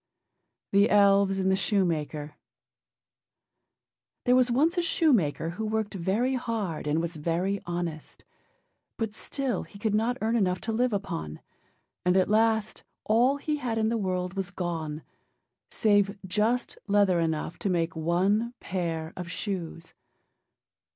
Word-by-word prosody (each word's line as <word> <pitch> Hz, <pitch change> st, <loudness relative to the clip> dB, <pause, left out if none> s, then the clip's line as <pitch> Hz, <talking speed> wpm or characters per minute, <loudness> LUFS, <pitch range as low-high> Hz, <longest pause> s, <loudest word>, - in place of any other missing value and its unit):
THE 200 Hz, +3 st, +4 dB
ELVES 200 Hz, -1 st, +4 dB
AND 190 Hz, 0 st, +1 dB
THE -, -, +4 dB
SHOEMAKER 160 Hz, -7 st, -1 dB, 1.9 s
There 250 Hz, -1 st, +5 dB
was 255 Hz, -1 st, +4 dB
once 300 Hz, +9 st, +2 dB
a 350 Hz, -, +2 dB
shoemaker, 230 Hz, -, +2 dB
who 220 Hz, +6 st, -4 dB
worked 220 Hz, -1 st, -1 dB
very 200 Hz, +8 st, 0 dB
hard 220 Hz, -, -3 dB
and 150 Hz, +2 st, +1 dB
was 170 Hz, 0 st, -3 dB
very 175 Hz, +6 st, -1 dB
honest: 175 Hz, -3 st, -5 dB, 0.7 s
but 220 Hz, -2 st, -2 dB
still 255 Hz, -1 st, -2 dB
he 165 Hz, +5 st, -12 dB
could 210 Hz, +1 st, -1 dB
not 230 Hz, +4 st, +1 dB
earn 225 Hz, +2 st, 0 dB
enough 185 Hz, -5 st, +1 dB
to 225 Hz, -, -3 dB
live 245 Hz, +3 st, +1 dB
upon; 80 Hz, -, -4 dB, 0.6 s
and 180 Hz, +1 st, +3 dB
at 185 Hz, -, +3 dB
last 220 Hz, 0 st, +2 dB, 0.2 s
all 245 Hz, +6 st, +3 dB
he 300 Hz, +1 st, -2 dB
had 245 Hz, -5 st, -2 dB
in 220 Hz, 0 st, +2 dB
the 230 Hz, -, 0 dB
world 185 Hz, -4 st, -2 dB
was 195 Hz, -2 st, -2 dB
gone, 165 Hz, -4 st, -4 dB, 0.7 s
save 205 Hz, -2 st, +2 dB
just 215 Hz, +6 st, 0 dB
leather 200 Hz, -3 st, +3 dB
enough 160 Hz, -1 st, -2 dB
to 200 Hz, -, -1 dB
make 170 Hz, -2 st, 0 dB
one 195 Hz, +9 st, +1 dB
pair 165 Hz, -3 st, -3 dB
of 180 Hz, -2 st, -6 dB
shoes. 170 Hz, -3 st, -5 dB
195 Hz, 140 wpm, -27 LUFS, 170-225 Hz, 1.9 s, There